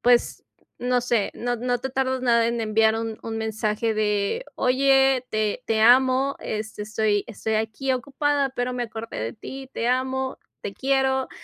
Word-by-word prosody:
pues, 240 Hz, 0 st, +2 dB, 0.3 s
no 250 Hz, 0 st, +1 dB
sé, 240 Hz, -4 st, 0 dB
no 245 Hz, +1 st, -2 dB
no 245 Hz, +1 st, -1 dB
te 265 Hz, +2 st, -4 dB
tardas 260 Hz, -1 st, -1 dB
nada 235 Hz, -2 st, +3 dB
en 235 Hz, 0 st, -1 dB
enviar 220 Hz, 0 st, +3 dB
un 225 Hz, -1 st, -4 dB
un 225 Hz, -1 st, -4 dB
mensaje 220 Hz, 0 st, -1 dB
de: 210 Hz, -, 0 dB
Oye, 270 Hz, 0 st, +3 dB
te 215 Hz, +3 st, -1 dB
te 220 Hz, -1 st, 0 dB
amo, 260 Hz, +3 st, +5 dB
este, 215 Hz, -1 st, -4 dB
estoy 210 Hz, -1 st, 0 dB
estoy 220 Hz, 0 st, -3 dB
aquí 220 Hz, +5 st, -1 dB
ocupada, 280 Hz, +1 st, 0 dB
pero 250 Hz, -1 st, -2 dB
me 245 Hz, -1 st, -2 dB
acordé 225 Hz, -, -6 dB
de 115 Hz, +1 st, -3 dB
ti, 265 Hz, 0 st, -9 dB
te 230 Hz, -, -2 dB
amo, 260 Hz, +1 st, 0 dB, 0.2 s
te 200 Hz, -, -6 dB
quiero, 265 Hz, -1 st, +1 dB
245 Hz, 170 wpm, -24 LUFS, 220-260 Hz, 0.3 s, amo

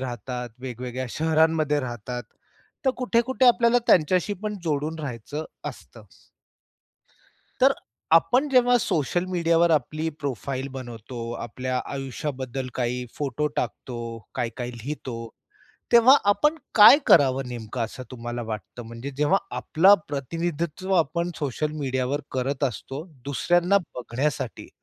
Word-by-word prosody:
राहतात 125 Hz, 0 st, -5 dB
वेगवेगळ्या 125 Hz, 0 st, -5 dB
शहरांमध्ये 160 Hz, -2 st, +2 dB
राहतात. 120 Hz, 0 st, -5 dB, 0.6 s
तर 265 Hz, -, +4 dB
कुठे-कुठे 250 Hz, +1 st, +2 dB
आपल्याला 235 Hz, 0 st, +5 dB
त्यांच्याशी 180 Hz, +4 st, +3 dB
पण 210 Hz, -1 st, -3 dB
जोडून 155 Hz, +1 st, -1 dB
राहायचं 145 Hz, +2 st, -5 dB, 0.2 s
असतं. -, -, -12 dB, 1.6 s
तर 275 Hz, +1 st, +7 dB, 0.4 s
आपण 250 Hz, -, +4 dB
जेव्हा 245 Hz, -2 st, +5 dB
सोशल 170 Hz, -, 0 dB
मीडियावर 170 Hz, -1 st, +3 dB
आपली 155 Hz, +2 st, 0 dB
प्रोफाइल 135 Hz, -1 st, -3 dB
बनवतो, 120 Hz, -2 st, -7 dB
आपल्या 125 Hz, +2 st, -3 dB
आयुष्याबद्दल 135 Hz, -1 st, -4 dB
काही 125 Hz, 0 st, -1 dB
फोटो 145 Hz, +1 st, -1 dB
टाकतो, 115 Hz, -2 st, -4 dB, 0.2 s
काही-काही 120 Hz, 0 st, -3 dB
लिहितो, 120 Hz, -3 st, -6 dB, 0.6 s
तेव्हा 240 Hz, +3 st, +8 dB
आपण 300 Hz, +9 st, +3 dB, 0.2 s
काय 215 Hz, +6 st, +10 dB
करावं 135 Hz, -3 st, +5 dB
नेमकं? 120 Hz, 0 st, -6 dB
असं 115 Hz, +3 st, -8 dB
तुम्हाला 120 Hz, -1 st, -5 dB
वाटतं, 110 Hz, +2 st, -6 dB
म्हणजे 115 Hz, +4 st, -7 dB
जेव्हा 150 Hz, +6 st, +3 dB, 0.2 s
आपला 190 Hz, +6 st, +5 dB
प्रतिनिधित्व 165 Hz, +5 st, -2 dB
आपण 170 Hz, +2 st, +1 dB
सोशल 150 Hz, +2 st, -2 dB
मीडियावर 130 Hz, +1 st, -1 dB
करत 135 Hz, +2 st, -1 dB
असतो 135 Hz, +4 st, -4 dB, 0.2 s
दुसऱ्यांना 175 Hz, +7 st, +2 dB, 0.2 s
बघण्यासाठी 125 Hz, +3 st, -3 dB
140 Hz, 110 wpm, -25 LUFS, 125-170 Hz, 1.6 s, काय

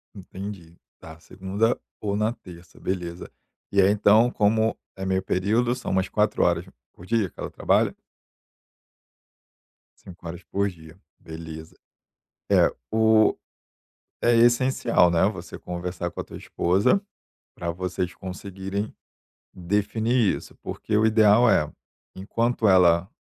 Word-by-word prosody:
Entendi. 95 Hz, -3 st, -9 dB, 0.2 s
Tá, 80 Hz, 0 st, -12 dB
segunda 95 Hz, +7 st, -1 dB, 0.2 s
ou 100 Hz, -1 st, -1 dB
na 110 Hz, +2 st, 0 dB
terça, 90 Hz, -6 st, -15 dB
beleza. 90 Hz, -2 st, -5 dB, 0.4 s
E 100 Hz, 0 st, +4 dB
aí, 95 Hz, -, +5 dB
então, 105 Hz, +3 st, +4 dB
como 110 Hz, +1 st, +1 dB, 0.2 s
é 95 Hz, 0 st, -5 dB
meio 95 Hz, 0 st, 0 dB
período, 110 Hz, +7 st, +1 dB
são 125 Hz, -, -5 dB
umas 95 Hz, 0 st, 0 dB
4h 105 Hz, 0 st, +1 dB, 0.3 s
por 90 Hz, -, -14 dB
dia 110 Hz, -2 st, 0 dB
que -, -, -25 dB
ela -, -, -4 dB
trabalha? -, -, +1 dB, 2.1 s
5h 85 Hz, 0 st, -10 dB
por 100 Hz, +1 st, -1 dB
dia, 80 Hz, -2 st, -14 dB, 0.2 s
beleza. 80 Hz, 0 st, -9 dB, 0.8 s
É, -, -, +4 dB, 0.2 s
o 110 Hz, 0 st, +4 dB, 0.9 s
é 120 Hz, 0 st, +4 dB
essencial, 120 Hz, -5 st, +3 dB
né, 85 Hz, +2 st, +3 dB
você 95 Hz, -5 st, -8 dB
conversar 90 Hz, 0 st, -5 dB
com -, -, -7 dB
a -, -, -5 dB
tua -, -, -11 dB
esposa, 95 Hz, -, +1 dB, 0.6 s
pra 85 Hz, -, -4 dB
vocês 90 Hz, 0 st, -3 dB
conseguirem 95 Hz, +2 st, -6 dB, 0.6 s
definir 105 Hz, +5 st, 0 dB
isso, -, -, -12 dB
porque 105 Hz, -, -3 dB
o 110 Hz, +1 st, +4 dB
ideal 110 Hz, +1 st, +5 dB
é: 75 Hz, -1 st, +2 dB, 0.5 s
enquanto 115 Hz, +3 st, 0 dB
ela 90 Hz, 0 st, +4 dB
95 Hz, 125 wpm, -24 LUFS, 90-110 Hz, 2.1 s, aí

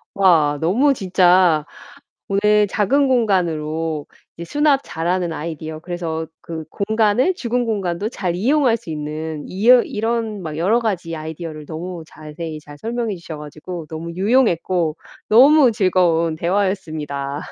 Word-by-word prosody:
와 160 Hz, -7 st, +4 dB
너무 245 Hz, -, +3 dB
진짜 180 Hz, -, +3 dB, 0.6 s
오늘 210 Hz, +1 st, +3 dB
작은 270 Hz, +9 st, +2 dB
공간으로 165 Hz, -, 0 dB, 0.3 s
이제 170 Hz, -, -6 dB
수납 295 Hz, -2 st, +3 dB
잘하는 175 Hz, +1 st, -2 dB
아이디어 155 Hz, 0 st, -6 dB
그래서 165 Hz, -2 st, -4 dB
그 160 Hz, -2 st, -7 dB
공간을 220 Hz, -, +1 dB
죽은 245 Hz, -2 st, -1 dB
공간도 200 Hz, -2 st, -2 dB
잘 180 Hz, -7 st, -3 dB
이용할 250 Hz, +3 st, +2 dB
수 225 Hz, -, -13 dB
있는 155 Hz, 0 st, -5 dB
이어 235 Hz, +6 st, +5 dB
이런 225 Hz, -1 st, -2 dB
막 155 Hz, -2 st, -5 dB
여러 205 Hz, +8 st, +2 dB
가지 180 Hz, -7 st, -2 dB
아이디어를 155 Hz, -1 st, -7 dB
너무 170 Hz, +1 st, -6 dB
자세히 155 Hz, 0 st, -8 dB
잘 145 Hz, -1 st, -13 dB
설명해 230 Hz, +2 st, -3 dB
주셔 165 Hz, -2 st, -8 dB
가지고 155 Hz, +3 st, -8 dB
너무 165 Hz, +1 st, -6 dB
유용했고 185 Hz, -6 st, +1 dB, 0.3 s
너무 265 Hz, +3 st, +7 dB
즐거운 175 Hz, -5 st, +2 dB
대화였습니다. 155 Hz, -6 st, -2 dB
180 Hz, 300 characters per minute, -20 LUFS, 160-215 Hz, 0.6 s, 너무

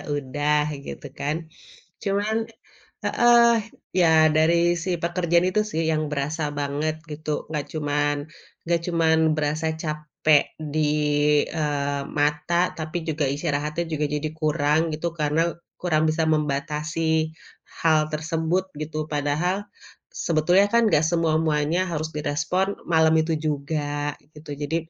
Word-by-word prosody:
udah, 150 Hz, +2 st, 0 dB, 0.2 s
gitu -, -, -7 dB
kan. 145 Hz, +2 st, -1 dB, 0.7 s
Cuman 205 Hz, +2 st, 0 dB, 0.7 s
heeh, 240 Hz, 0 st, +5 dB, 0.4 s
ya 180 Hz, -2 st, +3 dB, 0.2 s
dari 155 Hz, +2 st, +3 dB, 0.2 s
si 180 Hz, +2 st, -1 dB
pekerjaan 170 Hz, 0 st, +2 dB
itu 215 Hz, -, +2 dB
sih 165 Hz, -6 st, -2 dB
yang 155 Hz, -1 st, 0 dB
berasa 150 Hz, +2 st, -2 dB, 0.2 s
banget 150 Hz, +2 st, -2 dB
gitu. 150 Hz, 0 st, -4 dB
Enggak 150 Hz, -2 st, -2 dB
cuman 145 Hz, -1 st, 0 dB, 0.5 s
enggak 170 Hz, 0 st, 0 dB
cuman 165 Hz, -2 st, +2 dB, 0.2 s
berasa 155 Hz, +1 st, -1 dB, 0.2 s
capek 150 Hz, -1 st, +2 dB, 0.3 s
di, 155 Hz, 0 st, +1 dB, 0.6 s
eee, 145 Hz, -3 st, -1 dB, 0.2 s
mata, 150 Hz, +3 st, +1 dB, 0.2 s
tapi 155 Hz, +2 st, -3 dB
juga 160 Hz, -2 st, -1 dB
istirahatnya 150 Hz, +1 st, -2 dB
juga 150 Hz, -1 st, 0 dB
jadi 150 Hz, +1 st, -1 dB
kurang 155 Hz, +1 st, +1 dB
gitu, 170 Hz, +2 st, -2 dB
karena 155 Hz, +3 st, +1 dB, 0.3 s
kurang 160 Hz, -3 st, +2 dB
bisa 155 Hz, +1 st, +1 dB
membatasi 155 Hz, +2 st, 0 dB, 0.5 s
hal 155 Hz, -2 st, +4 dB
tersebut 160 Hz, +4 st, -1 dB
gitu. 155 Hz, 0 st, -3 dB
Padahal 155 Hz, +7 st, -1 dB, 0.5 s
sebetulnya 175 Hz, +5 st, +3 dB
kan 235 Hz, 0 st, +4 dB
gak 155 Hz, -3 st, +4 dB
semua-muanya 160 Hz, -1 st, +1 dB
harus 155 Hz, -1 st, -2 dB
direspon 150 Hz, +5 st, 0 dB, 0.2 s
malam 160 Hz, -1 st, +4 dB
itu 160 Hz, +1 st, -1 dB
juga, 145 Hz, 0 st, -2 dB, 0.2 s
gitu. 150 Hz, 0 st, -11 dB
Jadi, 145 Hz, +3 st, -1 dB
155 Hz, 120 wpm, -24 LUFS, 150-165 Hz, 0.7 s, heeh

